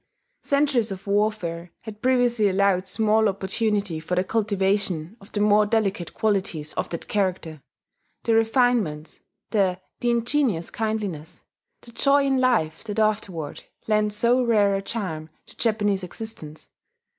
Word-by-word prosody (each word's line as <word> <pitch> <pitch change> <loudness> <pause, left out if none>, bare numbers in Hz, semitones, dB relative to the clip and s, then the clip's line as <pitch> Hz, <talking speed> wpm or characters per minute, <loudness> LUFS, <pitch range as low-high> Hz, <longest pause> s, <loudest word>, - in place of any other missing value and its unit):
Centuries 280 -6 +1
of 195 0 -7
warfare 200 -5 -1
had 215 -1 -10
previously 245 -4 +3
allowed 190 -1 +2
small 220 +2 +2
opportunity 200 -2 -1
for 165 +3 -3
the 180 - +2
cultivation 195 -4 0
of 195 - -16
the 205 - -2
more 210 0 +4
delicate 200 -6 0
qualities 190 -8 -1
of - - -3
that 170 - -6
character: 185 -6 -2 0.6
the 230 - +2
refinements, 225 - +1 0.3
the 190 -4 +1 0.2
ingenuous 235 - +1
kindliness, 210 -8 -4 0.4
the 235 - -15
joy 280 +3 +3
in 270 -1 +2
life 220 -12 +1
that 210 -1 -5
afterward 205 -8 -1 0.2
lent 210 -1 +2
so 235 +4 +2
rare 210 -4 +3
a 195 - 0
charm 180 -8 -4 0.2
to - - -14
Japanese 205 -4 0
existence. 180 -5 -8
205 Hz, 135 wpm, -24 LUFS, 185-225 Hz, 0.6 s, more